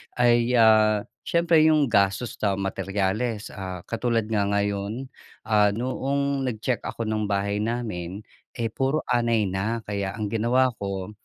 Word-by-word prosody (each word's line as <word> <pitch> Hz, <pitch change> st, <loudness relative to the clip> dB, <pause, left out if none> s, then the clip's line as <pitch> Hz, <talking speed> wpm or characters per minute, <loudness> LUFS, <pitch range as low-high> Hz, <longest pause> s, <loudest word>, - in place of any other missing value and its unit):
ay, 120 Hz, 0 st, +3 dB
ah, 110 Hz, -2 st, +5 dB, 0.2 s
siyempre 170 Hz, -1 st, +3 dB
yung 150 Hz, -5 st, +3 dB
gastos 100 Hz, +4 st, +1 dB
sa 100 Hz, -2 st, +1 dB
materyales, 100 Hz, +3 st, -2 dB
ah, 95 Hz, -2 st, -6 dB
katulad 115 Hz, -1 st, -1 dB
nga 100 Hz, -2 st, +1 dB
ngayon. 100 Hz, +5 st, -2 dB, 0.3 s
Ah, 105 Hz, -2 st, +3 dB
noong 135 Hz, +2 st, -1 dB
nag-check 115 Hz, +1 st, -1 dB
ako 115 Hz, -, -4 dB
nung 110 Hz, -1 st, -1 dB
bahay 100 Hz, +1 st, -1 dB
namin, 105 Hz, -4 st, -3 dB, 0.3 s
eh, 115 Hz, -3 st, -2 dB
puro 135 Hz, +5 st, 0 dB
anay 115 Hz, -3 st, +2 dB
na 100 Hz, +4 st, -2 dB
kaya 100 Hz, -2 st, -3 dB
ang 105 Hz, -2 st, -4 dB
ginawa 125 Hz, +3 st, +2 dB
ko, 100 Hz, 0 st, -4 dB
110 Hz, 140 wpm, -25 LUFS, 100-120 Hz, 0.3 s, ah